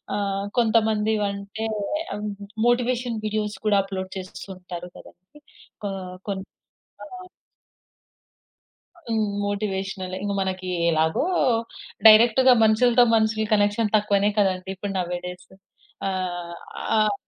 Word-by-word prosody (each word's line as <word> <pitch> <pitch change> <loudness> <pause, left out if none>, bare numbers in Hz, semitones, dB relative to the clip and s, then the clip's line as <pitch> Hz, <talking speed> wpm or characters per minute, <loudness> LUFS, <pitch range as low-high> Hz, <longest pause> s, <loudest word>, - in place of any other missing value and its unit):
ఆహ్, 200 -1 -1
కొంతమంది 220 -1 +2 0.2
అంటే 200 +3 -6 1.0
మోటివేషన్ 245 -1 +1
వీడియోస్ 210 -1 -2
కూడా 205 -1 +4
అప్లోడ్ 190 -1 -5
చేస్తూ 185 0 -8
ఉంటారు 180 -1 -8
కదండి. 185 +12 -17 0.5
ఆ! - - -2 0.4
కోన్ 195 -1 -3 0.6
ఆ! - - -8 2.0
హ్మ్. 220 -2 0 0.2
మోటివేషనలే 195 -2 -3
ఇంక 205 - -1
మనకి 185 -1 -3 0.2
ఎలాగో 160 - +1 0.3
మొత్తం 230 -3 -10
డైరెక్ట్‌గా 235 +4 +7
మనుషుల 220 -1 +4
కనెక్షన్ 205 +1 +2
తక్కువనే 205 -1 +2
కదండీ! 190 -2 +1
ఇప్పుడు 195 +1 -5
నౌ 180 - 0
ఏ - - -8
డేస్ 180 0 -9 0.6
ఆహ్, 185 +3 -2
205 Hz, 100 wpm, -24 LUFS, 190-220 Hz, 2.0 s, డైరెక్ట్‌గా